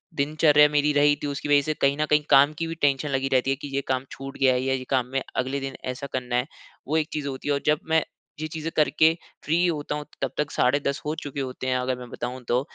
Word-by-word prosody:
दिनचर्या 150 +1 +4
मेरी 150 0 +2
रही 145 0 +4
थी, - - -1
उसकी 140 +1 -4
वजह 145 -1 +6
से 155 +2 -2
कहीं 140 +1 +3
न 155 - +1
कहीं 150 0 +4
काम 145 +2 +6
की 165 - -2
भी 165 - -4
टेंशन 145 0 +2
लगी 135 0 0
रहती 130 +1 +2
है 135 - +2
कि 145 - -5
ये 140 - +1
काम 130 0 -1
छूट 135 0 -8
गया 130 -1 +4
है 125 - 0
या 135 0 0
ये 130 - -2
काम 130 -2 +2
में 135 - +1
अगले 130 +2 -1
दिन 135 -1 -5
ऐसा 130 +2 -4
करना 125 -1 -2
है। 125 +3 +1 0.4
वो 155 +2 +1
एक 155 0 0
चीज़ 150 -2 -3
होती 135 +1 -6
है, 145 - +2
और 140 - -1
जब 150 0 +3
मैं 160 -1 +3 0.4
ये 155 - -3
चीज़ें 160 +1 -5
कर 155 - +3
के 160 +1 +6 0.3
फ्री 170 +3 +2
होता 150 -3 -2
हूँ, 150 - -5 0.2
तब - - -1
तक 150 -1 -1
साढ़े 140 +3 +2
10 140 -1 -2
हो 150 - -1
चुके 145 -1 -6
होते 130 0 -5
हैं 130 - +1
अगर 125 0 -1
मैं 125 -1 -9
बताऊँ 125 +1 -5
तो। 120 +1 +2
140 Hz, 280 wpm, -25 LUFS, 130-150 Hz, 0.4 s, वजह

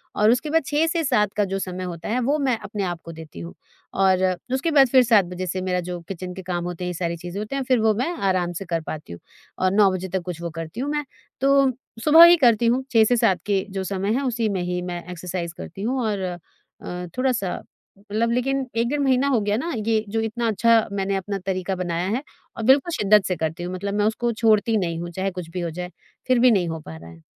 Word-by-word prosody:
और 210 +2 +4
उसके 295 +5 0
बाद 325 -2 +2
6 300 +2 +1
से 330 0 0
7 210 -7 +1
का 205 - +3
जो 195 +1 -3
समय 185 -1 -4
होता 170 +1 -6
है, 245 - +1
वो 275 +5 +1
मैं 260 -4 +1
अपने 200 -1 -5
आप 175 -2 -3
को 165 - -7
देती 160 - -11
हूँ। 85 -1 -8 0.4
और 190 -1 +3 0.3
उसके 300 +5 0
बाद 275 -3 +6
फिर 255 +1 +5
7 220 -5 +4
बजे 180 +1 -5
से 185 +1 -2
मेरा 180 -1 0
जो 175 -1 -4
किचन 180 -1 -6
के 190 - -8
काम 175 -1 -3
होते 180 0 -5
हैं, 180 - -2
ये - - -3
सारी 170 0 -3
चीज़ें 175 +4 -6
होते 215 +6 -5
हैं, 275 - -1
फिर 255 -1 +2
वो 220 -1 +3
मैं 255 +10 -1 0.2
आराम 180 -2 0
से 190 +3 -6
कर 165 -1 -2
पाती 150 - -6
हूँ 85 - -10 0.4
और 185 0 +2
9 200 -1 +5
बजे 185 0 -3
तक 190 - 0
कुछ 175 -2 -6
वो 170 - -3
करती 165 +7 -7
हूँ 280 +3 -2
मैं। 295 0 -1 0.4
तो 275 -1 +4 0.3
सुबह 320 +4 +9
ही 345 - +8
करती 235 -4 +4
हूँ, 250 +3 +2
6 225 -2 +6
से 245 +3 +3
7 185 -6 +3
के 195 -2 +1
जो 190 0 -3
समय 195 +2 -1
है, 275 - -1
उसी 235 -4 0
में 190 -2 -1
ही 180 0 -2
मैं 175 -1 -5
एक्सरसाइज़ 175 -1 -5
करती 195 - -8
हूँ 255 +5 -1
और 205 -2 -1
अ, 180 0 -8
थोड़ा-सा 250 -8 0 0.4
मतलब 215 +3 -1
लेकिन 265 +2 0
1 230 +1 +1
डेढ़ 295 0 -1
महीना 270 0 +2
हो 250 -5 +3
गया 205 +1 0
ना, 335 +7 -3
ये 220 0 0
जो 225 +2 -1
इतना 225 +1 -2
अच्छा 225 +1 +3
मैंने 195 0 -1
अपना 195 +1 -3
तरीका 190 0 -2
बनाया 175 0 -2
है 270 - -6 0.3
और 225 - -4
बिल्कुल 270 +8 +4
शिद्दत 210 - +4
से 180 - 0
करती 160 +1 -3
हूँ। 180 - -4
मतलब 200 +2 -3
मैं 205 0 +1
उसको 235 +2 0
छोड़ती 220 0 +2
नहीं 170 -4 -2
हूँ 175 - -5
चाहे 190 +2 -2
कुछ 180 -2 -7
भी 180 +1 -4
हो 170 - -2
जाए, 180 +2 -6 0.4
फिर 255 -2 +3
भी 250 0 +6
नहीं 185 -5 +2
हो 160 - -4
पा 80 - -10
रहा 80 +1 -12
है। 80 -1 -15
200 Hz, 255 wpm, -23 LUFS, 180-240 Hz, 0.4 s, सुबह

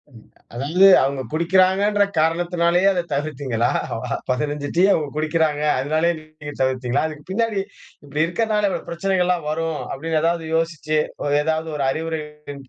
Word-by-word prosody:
ம் 110 - -15 0.3
அதாவது, 135 +4 -4
இல்ல 190 +2 +5 0.2
அவங்க 135 0 -1
குடிக்கிறாங்கன்ற 190 +5 +3
காரணத்தினாலேயே 170 +3 +2
அத 180 -2 0
தவிர்த்தீங்களா? 140 -5 -1 0.6
15 145 +2 -1
டீ 180 - +4
அவங்க 150 -2 +1
குடிக்கிறாங்க. 155 -1 0 0.2
அதனாலேயே 155 +5 +1
டீய 155 - -16 0.2
நீங்க 145 0 -6
தவிர்த்தீங்களா? 130 +1 0
அதுக்கு 150 0 -10
பின்னாடி 220 -1 0 0.4
இப்படி 145 +2 -1
இருக்கிறனால 210 +3 0 0.2
பிரச்சனைகலெல்லாம் 180 -1 0
வரும் 160 0 -2
அப்படினு 160 +3 -1
ஏதாவது 165 -1 0
யோசிச்சு, 155 -2 0 0.4
ஏதாவது 160 +1 -1
ஒரு 140 -2 -1
அறிவுரையின் 150 -3 -6
160 Hz, 130 wpm, -21 LUFS, 145-175 Hz, 0.6 s, இல்ல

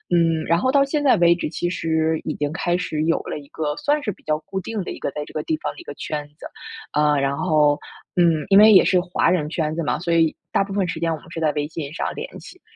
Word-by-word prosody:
嗯， 165 -2 +2
然 170 +1 +2
后 260 - +1
到 280 0 +4
现 290 +1 -1
在 270 - +5
为 170 0 +5
止， 170 - -3
其 175 - -2
实 160 -2 0
已 155 - -3
经 145 0 -2
开 175 -1 0
始 155 -4 -3
有 165 +1 +2
了 - - -5
一 140 - -14
个 150 -2 -3
算 295 +1 +1
是 210 - -1
比 - - -15
较 155 0 0
固 190 +3 -5
定 210 +1 -4
的 - - -6
一 - - -8
个 - - -2
在 150 - -4
这 - - -14
个 155 - -2
地 320 - -1
方 - - -3
的 - - -14
一 350 - -10
个 - - -7
圈 150 -1 -5
子， - - -11 0.5
啊， 150 -1 +2
然 140 0 0
后， 150 -4 +3 0.4
嗯， 165 -4 +3
因 195 +1 +7
为 215 +1 +8
也 190 - +7
是 185 - +3
华 175 -1 +1
人 155 -5 0
圈 155 -2 -2
子 165 - -2
嘛， - - 0
所 170 +1 -2
以 165 -2 +3 0.2
大 - - +2
部 195 - -9
分 195 -3 0
时 - - -4
间 165 -1 0
我 160 - -2
们 165 - -17
是 165 - -5
在 155 -2 +2
微 150 0 -2
信 150 -2 -6
上 - - -3
联 475 +3 -6
系。 370 - -14
165 Hz, 310 characters per minute, -22 LUFS, 155-185 Hz, 0.5 s, 为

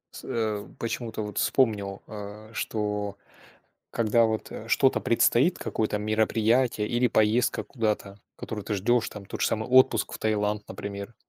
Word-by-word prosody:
С - - -8
э, 110 -3 -2
почему-то 115 -1 -3
вот 105 -1 -4
вспомнил, 100 -6 +1
а, 105 +1 -9
что 105 -3 -2 0.7
когда 115 0 +3
вот, 110 -1 -3
э, 115 - -8
что-то 135 +2 +3
предстоит, 125 +8 +3
какое-то 105 -1 -1
мероприятие 110 +2 +2
или 120 +1 +2
поездка 110 +3 +2
куда-то, 105 -4 -2 0.2
которую 105 -3 -6
ты 105 - -2
ждешь, 115 +4 +2
там, 105 -2 -10
тот - - -7
же - - +3
самый 110 +2 -2
отпуск 130 -3 +4
в - - -6
Таиланд, 105 -1 0
например. 100 +2 -6
110 Hz, 150 wpm, -27 LUFS, 105-115 Hz, 0.7 s, отпуск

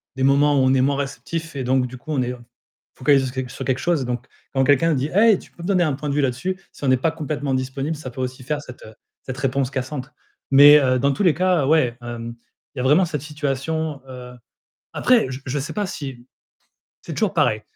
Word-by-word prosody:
des 130 - -2
moments 145 +2 +4
où - - +3
on 130 0 +4
est 130 - +3
moins 140 +1 +1
réceptif 160 +3 -5
et 130 - -3
donc, 130 0 +1
du 130 - -10
coup, 155 +5 -9
on 140 -4 +1
est 125 0 -1
f - - -9 0.6
focalisés 135 0 +3
sur 130 - -5
que 125 - -10
sur - - -6
quelque 130 -1 0
chose, 150 -2 0
donc 125 0 -4 0.3
quand 135 - +2
quelqu'un 145 +4 +3
dit: 140 +2 -1
«Hé! 215 -2 +5
Tu - - -17
peux 170 - -12
me 175 - -4
donner 185 -3 +3
un 150 -4 +1
point 145 +2 -4
de - - -1
vue 145 - +2
là-dessus?» 140 +9 -2
si - - -14
on - - 0
n'est 130 - +4
pas 160 +6 +1
complètement 145 -3 -3
disponible, 135 +4 -2
ça 130 -4 -8
peut 130 - -6
aussi 130 0 -5
faire 150 +2 -2
cette, 125 -3 -12
heu, 110 - -12 0.3
cette 130 0 -6
réponse 135 0 -1
cassante 130 +1 -4 0.4
mais, 145 +2 +9
heu, 130 -2 +2
dans 140 +2 +2
tous 170 - -2
les 175 -5 +5
cas, 180 -3 +2
ouais, 135 -7 +2
hem, 120 -1 -6 0.4
il - - -5
y - - 0
a - - -2
vraiment 155 +8 +4
cette 150 -4 -4
situation, 150 +1 -3
heu, 125 -1 -9 0.6
après, 250 -2 +3
je 130 - -6
je 135 +2 -2
sais 135 - -5
pas 205 -2 -2
si 135 -8 -7 0.7
c'est - - -7
toujours - - 0
pareil. - - +2
140 Hz, 245 wpm, -22 LUFS, 130-155 Hz, 0.7 s, mais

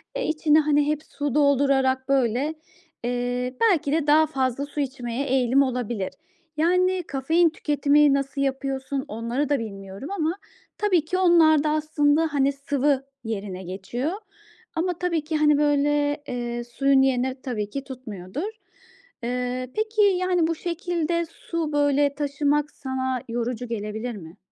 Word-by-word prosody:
eee, - - -1
içine, 310 0 +3
hani, 295 -1 +2
hep 305 0 -1
su 290 -3 -4
doldurarak, 275 -2 +3
böyle, 270 +3 +1 0.5
eee, 245 +1 -2
belki 345 -10 +3
de 310 -1 +1
daha 310 +2 +6
fazla 265 -1 -1
su 290 +1 -7
içmeye 260 -1 -3
eğilim 260 +1 +3
olabilir. 240 -6 -2 0.5
Yani, 365 +2 +2
kafein 320 +5 +2
tüketimini 295 -1 +3
nasıl 275 0 -1
yapıyorsun 270 0 -2
onları 235 +6 -2
da 285 -3 +2
bilmiyorum 195 - -7
ama 335 -2 -1 0.4
tabii 365 -7 +2
ki 365 +3 -1
onlar 330 -5 +5
da 305 - +1
aslında, 305 0 +2
hani, 280 -1 +2
sıvı 280 -1 0 0.2
yerine 195 -4 -5
geçiyor 200 - -3 0.6
ama 350 +1 -1
tabii 340 -4 0
ki, 310 0 -1
hani, 300 -1 +4
böyle, 290 0 +1
eee, 240 -1 -3
suyun 270 +3 +2
yerini 260 -1 +1
tabii 210 -5 -3
ki 275 +4 -5
tutmuyordur. 250 - -6 0.7
Eee, 250 +1 -2
peki, 435 0 0
yani, 365 -4 +3
bu 330 - -1
şekilde 340 -1 -1
su, 330 -3 -4
böyle, 285 -1 +2
taşımak 290 +1 0
sana 260 -2 -3
yorucu 240 +1 -3
gelebilir 220 +1 -4
mi? 170 -1 -11
280 Hz, 140 wpm, -24 LUFS, 250-310 Hz, 0.7 s, daha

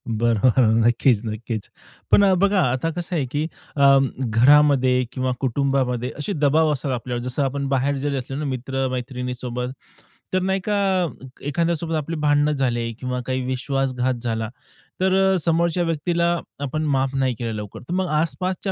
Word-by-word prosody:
बरोबर, 115 +2 +2 0.3
नक्कीच, 120 -1 +3
नक्कीच. 110 0 -4 0.4
पण 205 - +6
अ, 195 -1 +5
बघा, 195 +1 +3
आता 130 +6 -1
कसं 175 +2 -4
आहे, 145 -5 0
की 145 +1 0 0.3
अं, 140 -1 +5
घरामध्ये 130 +1 +4
किंवा 130 0 -1
कुटुंबामध्ये 130 -2 0
असे 200 +8 -2
दबाव 150 +1 +3
असतात 135 0 -3
आपल्यावर, 120 0 -3
जसं 125 +3 -1
आपण 140 +1 -2
बाहेर 135 +1 +1
जरी 140 +1 -2
असले 135 +1 -5
ना 150 - -3
मित्र 135 0 -2
मैत्रिणीसोबत, 125 -1 -4 0.6
तर 185 - +2
नाही 190 +1 0
का 210 - +1 0.7
एखाद्यासोबत 165 +1 -1
आपली 155 +2 -2
भांडण 145 0 +3
झाले 120 -4 -1
किंवा 125 -1 -3
काही 130 0 -1
विश्वासघात 130 0 -1
झाला, 115 -2 -2 0.5
तर 185 0 +2 0.2
अ, - - +2
समोरच्या 170 +2 +1
व्यक्तीला 170 +1 0 0.4
आपण 155 +3 -2
माफ 135 0 0
नाही 130 -2 +1
केलं 115 -2 -3
लवकर, 105 -2 -7
तर - - -2
मग 185 0 0
आसपासच्या 185 +3 -2
135 Hz, 155 wpm, -22 LUFS, 125-155 Hz, 0.7 s, पण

